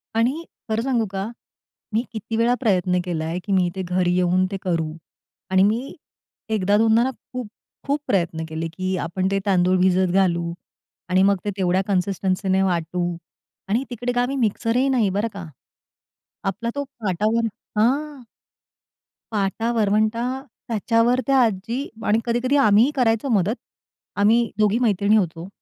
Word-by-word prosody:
आणि 255 +9 +1 0.3
खरं 220 +1 0
सांगू 245 -4 +1
का? 195 +2 -3 0.6
मी 225 - +2
किती 220 +1 -4
वेळा 235 +1 +3
प्रयत्न 185 -6 +2
केलाय, 165 0 -2
की 205 - -5
मी 185 -2 +3
ते 190 - -3
घरी 180 0 +1
येऊन 180 +1 +2
ते 195 - -2
करू 165 -4 -1 0.6
आणि 190 0 +5
मी 225 +6 0 0.6
1दा-2दा 220 +3 +3
ना 260 - +1
खूप-खूप 255 +4 -6
प्रयत्न 170 -4 0
केले, 160 +1 -3
की 185 +3 -3
आपण 185 +3 -1
ते 195 - +1
तांदूळ 185 -2 +3
भिजत 185 0 +3
घालू 170 -3 +1 0.6
आणि 185 +1 +4
मग 200 0 +4
ते - - 0
तेवढ्या 185 0 +2
कन्सिस्टन्सीने 190 0 0
वाटू 175 -1 -1 0.7
आणि 230 +6 +1
तिकडे 245 0 -3
गावी 245 +3 +1
मिक्सरही 235 +2 +1
नाही 240 -6 +2
बरं 215 +3 +1
का, 200 -3 -7 1.0
आपला 215 +5 -2
तो 285 - -1 0.2
पाटावर 215 +3 +1 0.3
हां. 275 +4 +1 1.1
पाटा 215 +3 0
वरवंटा 215 +1 +2 0.5
त्याच्यावर 230 +2 +2
त्या 275 -1 +4
आजी 230 +6 -2 0.2
आणि 215 +2 +3
कधी-कधी 240 +3 +1
आम्हीही 215 +7 +5
करायचो 235 0 +1
मदत. 210 -1 +2 0.6
आम्ही 225 +3 +3
2घी 215 +2 +3
मैत्रिणी 210 -3 +3
होतो. 170 -3 -2
205 Hz, 140 wpm, -22 LUFS, 185-230 Hz, 1.1 s, आणि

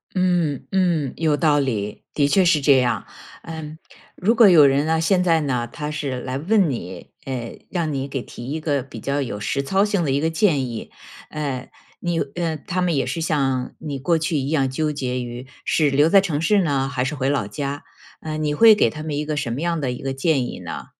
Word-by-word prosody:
嗯， 175 -7 +1
嗯， 175 -8 +1
有 155 -3 +1
道 150 -2 +3
理。 105 -6 -3
的 145 - +3
确 185 +6 +3
是 165 -4 +4
这 140 -1 +5
样。 120 -5 0 0.4
嗯， 160 -1 -8 0.4
如 215 +6 +2
果 225 -3 +7
有 155 -5 +8
人 140 +1 +2
呢， 160 +1 +1
现 180 +3 +2
在 165 -3 +3
呢， 125 -4 -1
他 150 0 -4
是 140 -4 -3
来 130 +1 -4
问 190 +5 +2
你， 95 -9 -6
哎， 125 -3 -5
让 170 -4 -1
你 135 0 -3
给 135 -1 -3
提 120 - -10
一 155 +2 -3
个 145 -3 0
比 120 -3 -10
较 140 +5 -1
有 115 -6 -4
实 135 +7 -1
操 190 +8 +2
性 205 -3 0
的 145 - 0
一 135 - +2
个 160 - +1
建 160 -5 +2
议。 115 -2 -7 0.4
呃， 140 -4 -4 0.3
你 175 -1 -1
呃， 160 +2 -2
他 180 +5 -3
们 175 -4 +1
也 135 - 0
是 135 +6 -3
像 135 -5 0
你 145 -3 -5
过 165 +4 +2
去 160 0 -1
一 135 0 -1
样 140 -4 +1
纠 150 +4 -1
结 130 -3 -2
于 120 +1 -7 0.2
是 150 -3 +2
留 145 +3 +4
在 195 +3 +6
城 165 -7 -2
市 200 +5 +3
呢 140 -4 0
还 130 -2 -1
是 140 +3 -2
回 135 -1 0
老 140 -7 0
家， 140 +5 -5 0.4
呃， 155 -1 -5
你 150 -1 -1
会 220 +8 +7
给 160 - +3
他 155 +4 -8
们 155 -2 -3
一 150 - -1
个 150 0 -3
什 120 - -2
么 125 - -3
样 170 -1 -1
的 130 -3 -1
一 125 - -7
个 135 0 -2
建 135 -1 +1
议 - - -7
呢？ - - -7
145 Hz, 245 characters per minute, -22 LUFS, 135-165 Hz, 0.4 s, 有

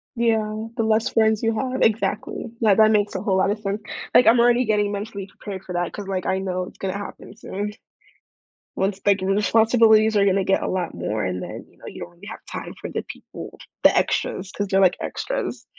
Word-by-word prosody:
Yeah, 220 -1 0
the 225 - 0
less 220 0 +2
friends 220 0 +2
you 225 0 +2
have 260 0 -2
Exactly. 220 -1 0 0.2
That 210 -2 +4
that 220 0 +6
makes 210 -1 +2
a 190 - -2
whole 190 -2 +1
lotta 200 +3 +2
sense. 205 0 -3 0.3
Like, 245 - +7
I'm 235 +1 +6
already 240 +1 +4
getting 210 -1 +1
mentally 200 -1 -5
prepared 195 -1 -8
for 180 - -7
that 175 0 -1
'cause, 205 -2 -7
like, 185 -2 -2
I 190 - 0
know 185 -1 -2
it's - - -11
gonna 195 +1 -3
happen 205 0 -9
soon. 210 -2 -5 1.1
Once 195 0 -1
the, 205 - +2
like, 195 -1 +2
re 195 +1 +1
responsibilities 220 +1 +4
are 200 - +4
gonna 195 -1 +2
get 195 - +1
a - - -1
lot 180 -3 -2
more 105 -1 -2
and 90 0 -3
then, - - -7
you - - -26
know, - - -13
you - - -9
don't 85 0 -8
really 85 - -15
have - - -9
time - - -6
for - - -6
the - - -3
people, - - -10 0.2
the - - +6
extras, 185 0 -1
'cause 205 -1 -3
they're 195 0 +3
like 185 -2 +4
extras. - - -4
205 Hz, 225 wpm, -23 LUFS, 190-220 Hz, 1.1 s, Like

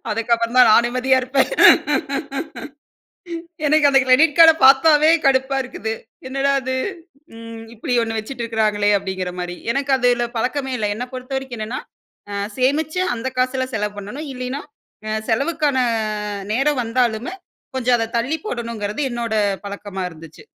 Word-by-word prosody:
அதுக்கப்புறம் 230 +2 0
தான் 250 -3 +7
நான் 235 +2 +6
நிம்மதியா 255 +2 +2
இருப்பேன். 265 - +1 2.2
எனக்கு 300 -1 +4
அந்த 270 -1 +5
கிரெடிட் 290 +5 +4
கார்ட 325 -1 +9
பாத்தாவே 300 +3 +6
கடுப்பா 270 0 +2
இருக்குது, 225 -3 -5 0.4
என்னடா 275 +1 0
அது 260 0 -3 0.6
ம், 230 0 -9
இப்டி 235 +2 -4
ஒண்ணு 225 -1 -3
வச்சுட்டு 240 +3 -7
இருக்குறாங்களே! 215 -2 0
அப்டிங்கிற 190 -2 -4
மாரி. 175 0 -4 0.2
எனக்கு 275 +1 -1
அதுல 245 -1 +2
பழக்கமே 265 +3 -2
இல்ல, 210 -1 -1
என்ன 245 - -4
பொறுத்தவரைக்கும் 260 0 -5
என்னன்னா 220 +4 -4 0.8
சேமிச்சு 300 +6 0 0.2
அந்த 235 +3 -4
காசுல 255 +1 0
செலவு 210 -1 -2
பண்ணணும். 250 +10 -7
இல்லின்னா 255 +3 -5 0.7
செலவுக்கான 285 +3 0 0.8
நேரம் 270 +1 +1
வந்தாலுமே 235 +5 -1 0.4
கொஞ்சம் 250 -1 +2
அத 225 0 -3
தள்ளி 265 +8 -1
போடணுங்குறது 230 - -4
என்னோட 235 -2 -3 0.3
பழக்கமா 200 -1 -6
இருந்துச்சு. 165 - -14
250 Hz, 130 wpm, -20 LUFS, 225-270 Hz, 2.2 s, கார்ட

